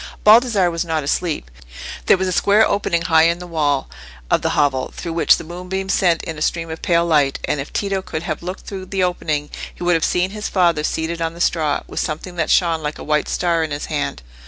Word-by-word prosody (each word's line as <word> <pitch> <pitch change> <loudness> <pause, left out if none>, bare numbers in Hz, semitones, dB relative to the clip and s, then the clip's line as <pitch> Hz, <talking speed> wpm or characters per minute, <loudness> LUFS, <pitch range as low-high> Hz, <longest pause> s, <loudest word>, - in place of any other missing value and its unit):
Baldassarre 215 -5 +5
was 165 0 -2
not 160 -3 -2
asleep. 145 - -2 0.6
There - - +6
was 190 0 -1
a - - -1
square 205 +4 +4
opening 170 -4 0
high 160 -1 +4
in 170 +1 +2
the 180 - -8
wall 150 -5 0 0.4
of - - +3
the - - -1
hovel, 140 -3 +1
through 170 - -5
which 165 - +4
the - - -7
moonbeams 180 +3 -4
sent 175 -3 +2
in 160 -2 -6
a - - -10
stream 165 +1 -1
of 160 - -7
pale 170 -2 +2
light; 145 -5 +2
and 150 - -1
if 135 - -6
Tito 195 -1 -1
could 160 -3 -5
have 155 -4 -4
looked 180 +2 -6
through 190 -2 -7
the 195 -1 -1
opening, 155 -5 -1 0.2
he - - -8
would 175 0 +3
have 165 -2 +1
seen 180 +1 +1
his 210 +1 -4
father 170 -5 +2
seated 165 +2 -2
on 165 0 -2
the - - -11
straw, 155 -4 +1
with - - -5
something 160 +4 -4
that 160 - 0
shone 165 -3 +3
like 150 0 -4
a - - -8
white 150 0 0
star 170 -2 +1
in 160 - -3
his 145 0 -4
hand. 145 - -2
170 Hz, 235 wpm, -20 LUFS, 155-180 Hz, 0.6 s, There